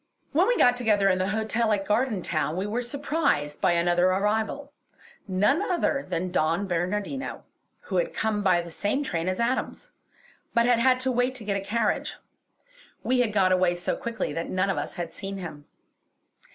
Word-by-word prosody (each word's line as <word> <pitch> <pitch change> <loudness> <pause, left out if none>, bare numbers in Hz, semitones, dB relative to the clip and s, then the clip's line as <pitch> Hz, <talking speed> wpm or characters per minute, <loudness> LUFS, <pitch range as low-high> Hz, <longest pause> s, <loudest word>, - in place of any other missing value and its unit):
When - - +3
we - - +2
got 245 0 +5
together 210 -5 +2
in 185 -1 +2
the 185 - 0
hotel 220 +2 0
at 195 -1 -1
Gardentown 210 -8 0
we 190 - -1
were 220 +4 -2
surprised 275 - -1
by - - +3
another 175 +1 +3
arrival; 215 +9 0 0.5
none 205 - +2
other 340 -7 0
than 180 0 -2
Don 165 +3 +1
Bernardino, 195 +9 -3 0.4
who 485 - -3
had - - +1
come 220 -1 -1
by 180 -3 +3
the 170 - -10
same 210 - -1
train 170 -10 -2
as 185 0 -1
Adams, 255 - -2 0.6
but 235 0 +4
had 245 -1 +3
had 255 +1 +4
to 260 0 +1
wait 250 +1 +1
to 245 - -5
get 200 -1 -1
a 200 - -1
carriage. 225 +4 -1 0.9
We 255 0 +1
had 240 -3 +2
got 190 -3 +3
away 185 -1 +3
so 175 - -2
quickly 230 -10 -4
that 165 +2 -4
none 185 +1 +1
of - - -3
us - - -5
had 175 -3 -5
seen 195 0 -6
him. 160 -6 -8
205 Hz, 185 wpm, -26 LUFS, 185-245 Hz, 0.9 s, got